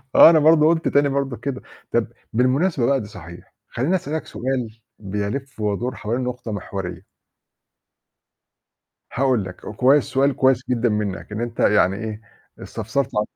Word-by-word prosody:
أنا 160 Hz, -1 st, +9 dB
برضه 155 Hz, 0 st, +5 dB
قُلت 165 Hz, 0 st, +2 dB
تاني 145 Hz, 0 st, +3 dB
برضه 135 Hz, -3 st, -2 dB
كده، 140 Hz, -2 st, -4 dB, 0.3 s
طَب -, -, +2 dB, 0.3 s
بالمناسبة 130 Hz, -, +2 dB
بقى 135 Hz, 0 st, +2 dB
دي 105 Hz, -, -8 dB
صحيح، 85 Hz, -4 st, -12 dB, 0.2 s
خلّيني 145 Hz, +10 st, 0 dB
أسألك 155 Hz, -2 st, -3 dB
سؤال 120 Hz, -4 st, -3 dB, 0.2 s
بيلف 105 Hz, +7 st, -4 dB
ويدور 105 Hz, +4 st, -2 dB
حولين 120 Hz, +4 st, -3 dB
نقطة 125 Hz, -2 st, -4 dB
محورية. 95 Hz, -2 st, -6 dB, 2.1 s
هاقول 125 Hz, -6 st, +1 dB
لك 90 Hz, -, -8 dB
كويس 130 Hz, +6 st, +3 dB
سؤال 135 Hz, 0 st, +1 dB
كويس 130 Hz, -2 st, +3 dB
جدًا 120 Hz, -1 st, +1 dB
منك 105 Hz, -2 st, -3 dB
إن 105 Hz, -, -4 dB
أنت 120 Hz, -1 st, -5 dB
يعني 100 Hz, -2 st, +3 dB
إيه، 110 Hz, 0 st, -6 dB, 0.4 s
استفسرت 120 Hz, +5 st, -3 dB
عن 105 Hz, 0 st, +1 dB
125 Hz, 145 wpm, -22 LUFS, 105-140 Hz, 2.1 s, أنا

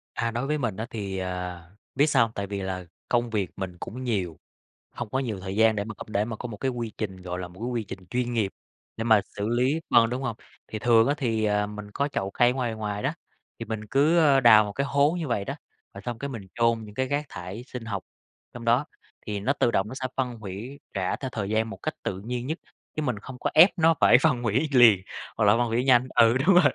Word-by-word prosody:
À, 115 Hz, 0 st, -1 dB
đối 120 Hz, +4 st, -2 dB
với 150 Hz, +1 st, 0 dB
mình 115 Hz, -8 st, -2 dB
á 110 Hz, -, -3 dB
thì, 100 Hz, -4 st, -4 dB
à, 90 Hz, -1 st, -4 dB, 0.3 s
biết 145 Hz, -, +4 dB
sao 145 Hz, -, +4 dB
hông? 115 Hz, -, -8 dB
Tại 100 Hz, 0 st, -3 dB
vì 100 Hz, 0 st, -4 dB
là 95 Hz, -1 st, -4 dB, 0.2 s
công 120 Hz, -1 st, +1 dB
việc 105 Hz, -5 st, -1 dB
mình 90 Hz, -2 st, -5 dB
cũng 125 Hz, +8 st, -6 dB
nhiều, 95 Hz, -10 st, -2 dB, 0.5 s
hông 120 Hz, -3 st, -6 dB
có 130 Hz, -, 0 dB
nhiều 115 Hz, -7 st, -3 dB
thời 95 Hz, +1 st, -5 dB
gian 110 Hz, 0 st, +4 dB
để 100 Hz, -, -1 dB
mà 110 Hz, +1 st, -7 dB
để 105 Hz, -1 st, 0 dB
mà 110 Hz, 0 st, -4 dB
có 125 Hz, -, -6 dB
một 110 Hz, -3 st, -8 dB
cái 130 Hz, +4 st, -1 dB
quy 120 Hz, -3 st, -4 dB
trình, 95 Hz, -4 st, -4 dB
gọi 90 Hz, 0 st, -5 dB
là, 90 Hz, -, -5 dB
một 90 Hz, +1 st, -16 dB
cái 120 Hz, -, -3 dB
quy 120 Hz, -2 st, -2 dB
trình 95 Hz, -1 st, -8 dB
chuyên 125 Hz, -1 st, -1 dB
nghiệp 105 Hz, -4 st, 0 dB, 0.5 s
để 115 Hz, -, -2 dB
mà 110 Hz, -3 st, +5 dB
xử 100 Hz, +1 st, -5 dB
lý 125 Hz, +6 st, +2 dB
phân, 115 Hz, -1 st, +5 dB
đúng 125 Hz, +2 st, -3 dB
hông? 120 Hz, -4 st, -2 dB, 0.3 s
Thì 110 Hz, -, -5 dB
thường 115 Hz, +1 st, +5 dB
á 140 Hz, -, +3 dB
thì, 115 Hz, -5 st, 0 dB
à, 105 Hz, 0 st, +2 dB
mình 105 Hz, 0 st, -8 dB
có 140 Hz, +6 st, 0 dB
chậu 95 Hz, -9 st, -3 dB
cây 120 Hz, +3 st, +4 dB
ở -, -, 0 dB
ngoài 125 Hz, -3 st, -2 dB
ngoài 105 Hz, -1 st, -4 dB
đó, 135 Hz, +4 st, 0 dB, 0.5 s
thì 115 Hz, -, -4 dB
mình 110 Hz, -1 st, -4 dB
cứ, 145 Hz, +9 st, +3 dB
ờ, 145 Hz, -4 st, +5 dB
đào 115 Hz, -4 st, +8 dB
một 105 Hz, -, -5 dB
cái 140 Hz, +7 st, -1 dB
hố 140 Hz, +2 st, +3 dB
như 160 Hz, -, -3 dB
vậy 105 Hz, -5 st, -1 dB
đó, -, -, -4 dB, 0.4 s
rồi 100 Hz, -, -9 dB
xong 120 Hz, -2 st, -4 dB
cái 140 Hz, -, -4 dB
mình 110 Hz, -7 st, -7 dB
chôn 115 Hz, -1 st, +2 dB
những 105 Hz, 0 st, -12 dB
cái 130 Hz, 0 st, 0 dB
rác 145 Hz, +2 st, -1 dB
thải 90 Hz, +6 st, -7 dB
sinh 125 Hz, -2 st, -7 dB
học 105 Hz, -3 st, -4 dB, 0.5 s
trong 120 Hz, -1 st, -8 dB
đó, 120 Hz, +5 st, +3 dB, 0.4 s
thì 105 Hz, -2 st, -3 dB
nó 125 Hz, +8 st, +1 dB
tự 120 Hz, -, +1 dB
động 95 Hz, -2 st, +1 dB
nó 115 Hz, -, -7 dB
sẽ 130 Hz, -, -3 dB
phân 125 Hz, -3 st, -1 dB
hủy, 110 Hz, +7 st, -7 dB
rã 95 Hz, -2 st, -1 dB
theo 130 Hz, -, -4 dB
thời 100 Hz, -3 st, -3 dB
gian 110 Hz, +1 st, +1 dB
một -, -, -7 dB
cách 155 Hz, -, -2 dB
tự 95 Hz, -, -3 dB
nhiên 120 Hz, +4 st, -4 dB
nhất, 160 Hz, +4 st, -3 dB, 0.4 s
chứ 155 Hz, -, -1 dB
mình 125 Hz, -8 st, -1 dB
không 125 Hz, +4 st, -9 dB
có -, -, 0 dB
ép 180 Hz, -, +9 dB
nó 165 Hz, 0 st, +5 dB
phải -, -, +8 dB
phân 140 Hz, -6 st, +2 dB
hủy 120 Hz, +7 st, +1 dB
liền, 120 Hz, -7 st, +7 dB, 0.4 s
hoặc 110 Hz, -, +2 dB
là 100 Hz, -, +6 dB
phân 120 Hz, 0 st, +1 dB
hủy 115 Hz, +2 st, 0 dB
nhanh 130 Hz, -1 st, +4 dB
ừ, 115 Hz, +1 st, +6 dB
đúng 195 Hz, -, +6 dB
rồi. 180 Hz, -, +6 dB
115 Hz, 265 wpm, -26 LUFS, 105-125 Hz, 0.5 s, ép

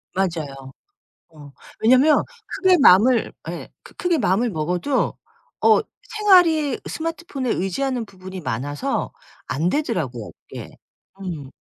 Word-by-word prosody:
맞아요. 150 Hz, -8 st, -3 dB, 0.6 s
어. 150 Hz, -3 st, -14 dB, 0.3 s
왜냐면 255 Hz, +7 st, +5 dB, 0.2 s
크게 375 Hz, -1 st, +3 dB
마음을 235 Hz, +1 st, +5 dB, 0.2 s
예. -, -, -7 dB
크 -, -, -16 dB
크게 350 Hz, -3 st, 0 dB
마음을 225 Hz, +3 st, +1 dB
먹어도 180 Hz, -, -1 dB, 0.5 s
어 -, -, +6 dB, 0.2 s
생활이 360 Hz, -, +3 dB
스마트폰에 325 Hz, -6 st, -4 dB
의지하는 235 Hz, +7 st, -1 dB
부분이 190 Hz, -2 st, -10 dB
많아서 135 Hz, +4 st, -2 dB, 0.4 s
안 150 Hz, +7 st, -1 dB
되더라고요 150 Hz, -, -2 dB, 0.2 s
그게. -, -, -9 dB, 0.4 s
음. 160 Hz, -8 st, -6 dB
195 Hz, 260 characters per minute, -22 LUFS, -, 0.6 s, 어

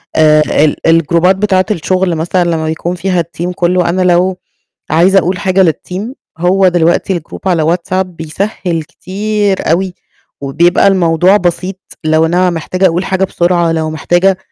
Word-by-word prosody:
آآ 155 Hz, -1 st, +4 dB, 0.2 s
ال 150 Hz, -, 0 dB
الجروبات 165 Hz, +3 st, +3 dB
بتاعة 190 Hz, -2 st, +1 dB
الشغل 185 Hz, -1 st, 0 dB
مثلًا 175 Hz, +3 st, 0 dB
لمّا 160 Hz, -1 st, -1 dB
بيكون 165 Hz, +3 st, -3 dB
فيها 180 Hz, 0 st, -1 dB
الTeam 170 Hz, +2 st, -5 dB
كلّه، 175 Hz, 0 st, +1 dB
أنا 185 Hz, +2 st, 0 dB
لو 180 Hz, +1 st, +2 dB, 0.5 s
عايزة 180 Hz, +5 st, +4 dB
أقول 180 Hz, +1 st, -2 dB
حاجة 190 Hz, 0 st, +2 dB
للTeam 180 Hz, +5 st, -8 dB, 0.4 s
هو 185 Hz, +2 st, +3 dB
دلوقتي 175 Hz, +1 st, +1 dB
الGroup 170 Hz, +4 st, -9 dB
على 165 Hz, -2 st, +1 dB
WhatsApp 185 Hz, +1 st, -2 dB
بيسهِّل 170 Hz, 0 st, -4 dB
كتير 200 Hz, +2 st, -2 dB
أوي، 185 Hz, +2 st, 0 dB, 0.5 s
وبيبقى 170 Hz, +8 st, +2 dB
الموضوع 180 Hz, 0 st, +3 dB
بسيط، 180 Hz, 0 st, -2 dB, 0.3 s
لو 155 Hz, +1 st, +2 dB
أنا 180 Hz, +2 st, +1 dB
محتاجة 180 Hz, +3 st, -2 dB
أقول 175 Hz, +2 st, -1 dB
حاجة 190 Hz, 0 st, -1 dB
بسرعة، 175 Hz, -2 st, +1 dB
لو 160 Hz, -1 st, -1 dB
محتاجة 175 Hz, +4 st, +1 dB
175 Hz, 150 wpm, -12 LUFS, 165-190 Hz, 0.5 s, آآ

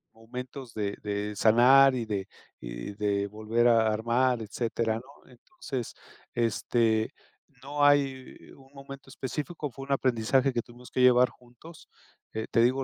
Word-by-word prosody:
momentos 125 Hz, +2 st, -9 dB
de 100 Hz, -2 st, -3 dB
de 105 Hz, 0 st, -3 dB
sanar 130 Hz, +6 st, +6 dB
y 120 Hz, -3 st, -2 dB
de 100 Hz, -3 st, -3 dB, 0.4 s
y -, -, -7 dB
de 100 Hz, -1 st, -1 dB
volver 110 Hz, +3 st, 0 dB
a 115 Hz, -2 st, +4 dB
armar, 120 Hz, +2 st, +1 dB
etcétera, 110 Hz, +1 st, -2 dB
¿no? 130 Hz, +4 st, -12 dB
Entonces, 125 Hz, -, -7 dB, 0.4 s
este, 115 Hz, +1 st, +1 dB, 0.5 s
no 145 Hz, +2 st, -2 dB
hay 140 Hz, -2 st, +1 dB
un 135 Hz, -1 st, -19 dB
momento 140 Hz, -1 st, -11 dB
específico, 150 Hz, +4 st, -5 dB
fue 135 Hz, +2 st, -9 dB
un 140 Hz, -, -5 dB
aprendizaje 130 Hz, +1 st, +2 dB
que 120 Hz, -, 0 dB
tuvimos 120 Hz, +1 st, -15 dB
que 130 Hz, -, -1 dB
llevar 125 Hz, 0 st, +6 dB
juntos. 125 Hz, +7 st, -16 dB, 0.6 s
Te 115 Hz, -, +4 dB
digo, 130 Hz, +3 st, +2 dB
120 Hz, 140 wpm, -28 LUFS, 110-135 Hz, 0.6 s, sanar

